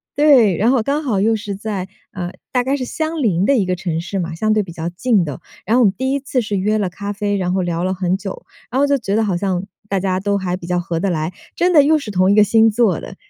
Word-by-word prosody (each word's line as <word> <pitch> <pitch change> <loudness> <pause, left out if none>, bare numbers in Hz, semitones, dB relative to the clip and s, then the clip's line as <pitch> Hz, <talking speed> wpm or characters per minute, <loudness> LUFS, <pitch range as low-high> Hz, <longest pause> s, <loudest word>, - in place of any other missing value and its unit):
对， 260 - +5
然 225 +7 +3
后 255 -4 +2
刚 285 +5 -1
好 225 -9 0
又 225 +2 +3
是 205 -2 -5
在 200 -2 -4 0.2
呃， 175 -2 -5 0.2
大 250 -1 +1
概 270 +2 0
是 260 - -4
相 315 +4 -3
邻 195 -7 +2
的 275 +3 +3
一 200 - +1
个 185 0 -1
城 170 -3 -3
市 195 +3 -4
嘛， 170 -2 -3
相 215 +6 0
对 215 -1 +2
比 180 - -10
较 165 +1 -4
近 200 +2 +1
的。 145 -3 -6 0.2
然 220 +5 +2
后 - - +4
我 - - +5
们 195 - +3
第 260 +1 -1
1 280 - 0
次 260 -2 -1
是 210 -3 -2
约 210 +3 +1
了 200 -3 -1
咖 200 +3 -6
啡， 205 0 -1
然 180 -1 -1
后 190 - +1
聊 175 -1 -2
了 185 +1 0
很 185 0 0
久， 195 -1 -7 0.2
然 250 - -2
后 285 - +4
就 280 0 +2
觉 205 -5 -2
得 225 - +2
好 200 -4 0
像 185 0 -1 0.2
大 195 - 0
家 185 0 -1
都 200 +1 0
还 185 -2 -2
比 170 - -10
较 180 0 0
合 170 -1 -3
得 195 +3 0
来。 160 0 -2 0.2
真 355 +1 +2
的 295 -4 +7
又 310 +2 +4
是 280 -8 -6
同 185 0 +3
一 - - +4
个 210 - +7
星 225 +2 +4
座 215 -6 +2
的， - - -9
200 Hz, 310 characters per minute, -19 LUFS, 185-235 Hz, 0.2 s, 的